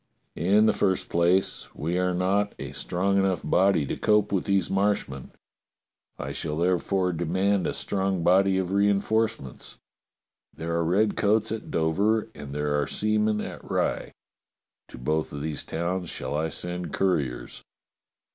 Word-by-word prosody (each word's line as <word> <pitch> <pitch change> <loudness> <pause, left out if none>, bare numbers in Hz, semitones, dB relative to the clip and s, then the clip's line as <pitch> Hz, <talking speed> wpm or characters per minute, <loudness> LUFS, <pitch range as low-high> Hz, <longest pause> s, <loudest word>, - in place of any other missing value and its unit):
In 100 +6 +3
the - - +4
first 95 -2 0
place, 85 +3 +2
we 85 +5 -1
are 90 0 +1
not 100 +3 +1
a - - -6
strong 100 +2 0
enough 95 -3 +1
body 95 -1 +3
to - - -3
cope 105 -1 +2
with 95 -3 0
these 100 -3 +2
Marshmen. 95 -10 -1 0.9
I - - -5
shall 75 -1 -3
therefore 90 +1 +1
demand 95 +4 +1
a - - -1
strong 95 -3 -1
body 95 +2 +4
of 95 -1 -1
reinforcements. 100 - 0 0.8
There 85 +1 -4
are 85 0 +1
redcoats 105 +4 +2
at 110 -1 -5
Dover 100 +8 +1
and 70 -1 -9
there 75 0 0
are 70 - -2
seamen 105 0 +1
at - - -7
Rye. - - -2 0.7
To - - -12
both 75 +5 -1
of 70 0 -5
these 75 -2 -3
towns 85 +2 -3
shall - - -4
I 80 +2 0
send 90 -1 -4
couriers. 70 -11 -1
95 Hz, 145 wpm, -26 LUFS, 80-100 Hz, 0.9 s, the